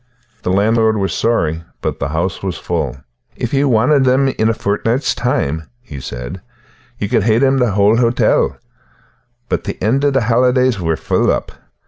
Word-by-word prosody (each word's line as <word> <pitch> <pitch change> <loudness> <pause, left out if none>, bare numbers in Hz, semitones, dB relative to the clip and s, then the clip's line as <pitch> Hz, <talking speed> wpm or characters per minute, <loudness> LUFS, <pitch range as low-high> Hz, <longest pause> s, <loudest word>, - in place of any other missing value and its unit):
The - - -3
landlord 110 +3 +2
was 95 -1 -1
sorry, 80 -9 0 0.2
but - - -3
the 70 - -1
house 85 +4 -2
was 95 -3 -3
full. 75 -7 -3 0.4
"If 120 - -4
ye 140 +1 +2
wanted 135 +3 +3
them 130 +1 +3
in 110 -4 0
a - - +2
fortnicht's 115 +7 0
time," 80 +3 -2
he 75 - -10
said, 65 +7 -7 0.6
"ye 105 - -2
could 110 - +2
hae 110 +2 +2
the 130 -4 +2
hale 105 +2 +4
hotel; 120 0 +2 0.9
but - - -2
tae - - -3
the - - -11
end 130 +6 +1
o' 145 - +4
the 135 -2 +1
holidays 125 0 +2
we're 80 -1 0
foll - - 0
up. - - -2
110 Hz, 175 wpm, -17 LUFS, 90-125 Hz, 0.9 s, hale